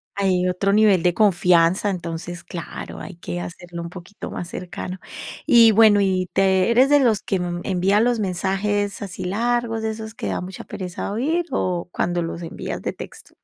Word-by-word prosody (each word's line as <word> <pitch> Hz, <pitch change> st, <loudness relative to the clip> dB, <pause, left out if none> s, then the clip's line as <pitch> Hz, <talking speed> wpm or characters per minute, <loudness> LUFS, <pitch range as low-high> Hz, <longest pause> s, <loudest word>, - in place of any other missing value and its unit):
Hay 185 Hz, -2 st, +1 dB
otro 190 Hz, +2 st, 0 dB
nivel 210 Hz, -4 st, +5 dB
de 175 Hz, -1 st, +2 dB
confianza, 180 Hz, -2 st, +3 dB
entonces, 170 Hz, -2 st, -5 dB
claro, 170 Hz, -, -7 dB
hay 190 Hz, -, -8 dB
que 90 Hz, -, -5 dB
hacerlo 170 Hz, -, -7 dB
un 170 Hz, -, -5 dB
poquito 180 Hz, +3 st, -9 dB
más 175 Hz, -, -5 dB
cercano. 180 Hz, +1 st, -6 dB, 0.5 s
Y 235 Hz, -5 st, +7 dB
bueno, 215 Hz, -1 st, +6 dB
y 185 Hz, -2 st, +1 dB
te 190 Hz, +1 st, +3 dB
¿Eres 255 Hz, +4 st, +5 dB
de 290 Hz, 0 st, +6 dB
los 225 Hz, -6 st, +2 dB
que, 195 Hz, -, -1 dB
mm, 175 Hz, 0 st, -3 dB
envía 195 Hz, +1 st, +2 dB
los 240 Hz, +1 st, +2 dB
mensajes 200 Hz, +2 st, -1 dB
así 190 Hz, -2 st, -6 dB
largos, 230 Hz, +3 st, 0 dB
de 220 Hz, -, -1 dB
esos 220 Hz, 0 st, -7 dB
que -, -, -5 dB
da -, -, -2 dB
mucha 185 Hz, 0 st, -8 dB
pereza 185 Hz, 0 st, -5 dB
oír, 315 Hz, +10 st, 0 dB
o 175 Hz, -1 st, -1 dB
cuando 175 Hz, 0 st, 0 dB
los 165 Hz, +1 st, -5 dB
envías 165 Hz, -, -5 dB
de -, -, -2 dB
texto, -, -, -10 dB
190 Hz, 185 wpm, -22 LUFS, 175-215 Hz, 0.5 s, Y